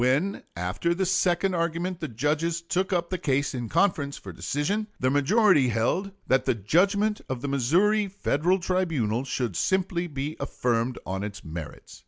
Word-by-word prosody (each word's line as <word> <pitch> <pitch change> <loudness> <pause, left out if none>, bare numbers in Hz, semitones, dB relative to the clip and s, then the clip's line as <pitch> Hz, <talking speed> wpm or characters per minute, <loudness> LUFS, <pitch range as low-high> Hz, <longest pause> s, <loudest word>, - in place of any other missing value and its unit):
When 145 +11 +1
after 90 - -1
the 190 +1 0
second 185 +1 +2
argument 170 +1 -1
the 155 - -3
judges 150 +7 0
took 180 +3 -1
up 175 -1 0
the 185 - -1
case 140 -3 0
in 120 -3 -4
conference 165 -6 +1
for - - -9
decision, 200 +10 -1
the 130 0 +2
majority 145 - +4
held 125 - 0 0.2
that 130 +1 +2
the - - +2
judgment 200 - +2
of 130 -2 -3
the - - -1
Missouri 180 - +2
Federal 185 -2 +1
tribunal 160 - 0
should 125 -7 -2
simply 180 - 0
be 145 0 -4
affirmed 120 0 -1
on 95 +1 -3
its 100 -1 -6
merits. 80 -2 -8
155 Hz, 165 wpm, -26 LUFS, 125-185 Hz, 0.2 s, majority